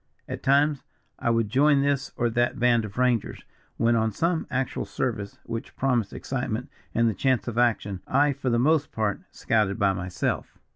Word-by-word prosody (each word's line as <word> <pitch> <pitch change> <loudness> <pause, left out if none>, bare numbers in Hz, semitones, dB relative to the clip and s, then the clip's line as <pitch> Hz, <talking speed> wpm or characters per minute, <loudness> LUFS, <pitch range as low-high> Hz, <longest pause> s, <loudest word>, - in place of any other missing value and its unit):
At - - -5
times 140 +1 +3 0.4
I - - 0
would 115 -2 +2
join 140 +5 +4
this 140 -1 0
or 120 -1 +1
that 120 +2 +1
band 120 -2 +3
of 100 +1 -10
rangers, 125 -3 0 0.3
when 115 +1 +3
on 110 -1 +1
some 165 - 0
actual 130 0 -2
service 110 -6 -3
which 115 0 -6
promised 125 -6 0
excitement 125 -3 -3 0.3
and 115 0 +3
the 110 - +1
chance 130 +3 0
of 120 0 -2
action, 105 -6 +1
I 140 +2 +3
for 130 - -3
the 120 - +2
most 150 +4 +2
part 105 -2 -1
scouted 105 -3 0
by 100 -3 +3
myself. 90 -1 -3
120 Hz, 180 wpm, -26 LUFS, 110-135 Hz, 0.4 s, join